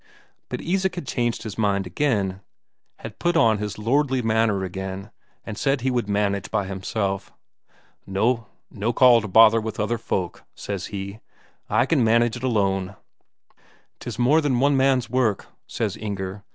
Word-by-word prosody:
But -, -, -4 dB
Isak 190 Hz, +2 st, 0 dB
had 175 Hz, -, -5 dB
changed 120 Hz, -2 st, -1 dB
his 110 Hz, 0 st, -7 dB
mind 100 Hz, -2 st, +1 dB
again; 95 Hz, -3 st, -1 dB, 0.6 s
had 110 Hz, -1 st, -10 dB
put 175 Hz, -1 st, +1 dB
on 110 Hz, -9 st, +4 dB
his 105 Hz, -1 st, -4 dB
lordly 130 Hz, +3 st, +1 dB
manner 110 Hz, -3 st, +1 dB
again, 95 Hz, +2 st, -6 dB, 0.3 s
and 110 Hz, -, -5 dB
said 135 Hz, -2 st, +1 dB
he 130 Hz, +1 st, 0 dB
would 120 Hz, -4 st, -1 dB
manage 100 Hz, -1 st, 0 dB
by 100 Hz, -, 0 dB
himself. 95 Hz, +1 st, -3 dB, 0.8 s
"No 115 Hz, +4 st, 0 dB, 0.5 s
call 125 Hz, -3 st, +6 dB
to 110 Hz, -, -5 dB
bother 115 Hz, +3 st, +6 dB
with 110 Hz, 0 st, -5 dB
other 110 Hz, +2 st, -1 dB
folk," 90 Hz, -6 st, -3 dB
says 100 Hz, -3 st, -5 dB
he; 100 Hz, 0 st, -6 dB, 0.5 s
"I 115 Hz, +5 st, +3 dB
can 135 Hz, -3 st, +2 dB
manage 115 Hz, +1 st, +3 dB
it 120 Hz, -, -8 dB
alone." 100 Hz, -5 st, 0 dB, 1.0 s
"'Tis -, -, -6 dB
more 135 Hz, +6 st, +4 dB
than 135 Hz, -5 st, +1 dB
one 140 Hz, +2 st, +3 dB
man's 130 Hz, -2 st, +2 dB
work," 120 Hz, -4 st, 0 dB, 0.2 s
says -, -, -2 dB
Inger. 100 Hz, -2 st, -5 dB
110 Hz, 155 wpm, -23 LUFS, 100-125 Hz, 1.0 s, call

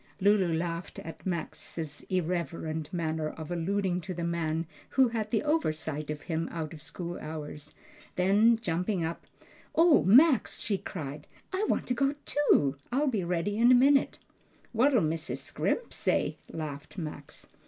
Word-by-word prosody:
Lulu 195 Hz, -3 st, +4 dB
laughed 170 Hz, +1 st, -3 dB
at 165 Hz, +3 st, -8 dB
Max's 160 Hz, -3 st, -4 dB
irreverent 165 Hz, -3 st, -2 dB
manner 160 Hz, -3 st, -1 dB
of 160 Hz, +1 st, -8 dB
alluding 180 Hz, +1 st, 0 dB
to 185 Hz, +1 st, -6 dB
the 170 Hz, -, -3 dB
man 165 Hz, -1 st, -1 dB, 0.3 s
who 260 Hz, -2 st, +6 dB
had 220 Hz, -2 st, -2 dB
the 220 Hz, -, +1 dB
oversight 155 Hz, -, -1 dB
of 150 Hz, -1 st, -4 dB
him 165 Hz, -1 st, -2 dB
out 160 Hz, -1 st, -4 dB
of 155 Hz, -, -10 dB
school 175 Hz, +2 st, -6 dB
hours; 150 Hz, -1 st, -7 dB, 0.4 s
then 205 Hz, +5 st, +4 dB
jumping 180 Hz, -3 st, -1 dB
up, 165 Hz, +1 st, -5 dB, 0.5 s
"O 330 Hz, -1 st, +6 dB
Max!" 255 Hz, -, +5 dB
she 200 Hz, -3 st, -1 dB
cried, 150 Hz, -6 st, -6 dB, 0.3 s
"I 405 Hz, +3 st, 0 dB
want -, -, +1 dB
to 250 Hz, -, 0 dB
go 275 Hz, +3 st, +1 dB
too! 145 Hz, -, +3 dB
I'll 280 Hz, +3 st, +2 dB
be 215 Hz, -7 st, -1 dB
ready 180 Hz, +4 st, -1 dB
in 240 Hz, +2 st, +6 dB
a -, -, +8 dB
minute." 275 Hz, +2 st, +4 dB, 0.5 s
"What'll 245 Hz, 0 st, +4 dB
Mrs. 160 Hz, 0 st, -1 dB
Scrimp 480 Hz, -, -2 dB
say?" -, -, 0 dB
laughed 155 Hz, +1 st, -6 dB
Max. 150 Hz, -4 st, -7 dB
175 Hz, 155 wpm, -29 LUFS, 160-220 Hz, 0.5 s, a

